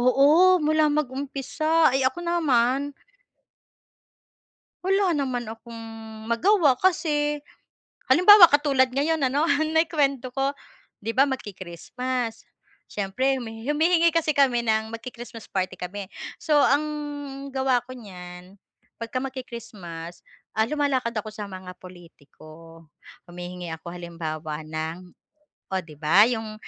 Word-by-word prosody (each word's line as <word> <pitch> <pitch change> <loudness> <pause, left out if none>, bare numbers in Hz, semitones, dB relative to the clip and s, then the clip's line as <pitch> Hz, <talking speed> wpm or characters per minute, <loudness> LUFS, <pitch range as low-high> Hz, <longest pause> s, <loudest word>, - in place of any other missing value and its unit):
Oo, 310 +8 +6
mula 310 0 +3
mag-umpisa, 290 +2 0
ay, 270 - +1
ako 260 +6 0
naman 285 -5 +1 1.9
wala 390 0 +2
naman 255 -7 -2
akong 230 +1 -10 0.6
magawa 290 - +3
kasi 295 -5 +1 0.7
halimbawa 365 +6 +9
katulad 285 -3 +3
ngayon 310 +4 +1
ano 270 +3 +1
na 315 +1 +2
yung 330 - -10
kuwento 275 -5 0
ko, 275 +1 0 0.5
'di 225 - -2
ba 270 +2 +5
magki-Christmas, 235 - -5 0.4
siyempre, 210 +7 0
humi 225 -1 -8
humihingi 330 +3 +3
kasi 330 -2 +2
kami 255 -4 +3
ng 220 0 +1
magki-Christmas 235 0 -9
party 185 -1 -2
kami. 190 +2 -6 0.3
So, 310 - 0
ang 290 +2 +3 0.7
gawa 265 -2 +2
ko 255 - -9
niyan 180 -3 -11 0.4
pagka 230 +2 -3
magki-Christmas, 215 -10 -8 0.3
ah, 220 +1 +2
lumalakad 265 -4 0
ako 215 0 -4
sa 210 -1 -6
mga 185 -1 -9
pulitiko, 165 -2 -15 0.4
humihingi 175 0 -7
ako 160 +2 -9
halimbawa 160 -3 -5
ng 160 +3 -5 0.6
oh, 190 - +1
'di 155 -3 -14
ba, 165 +6 +5
yung 220 -3 -4
250 Hz, 115 wpm, -25 LUFS, 185-290 Hz, 1.9 s, halimbawa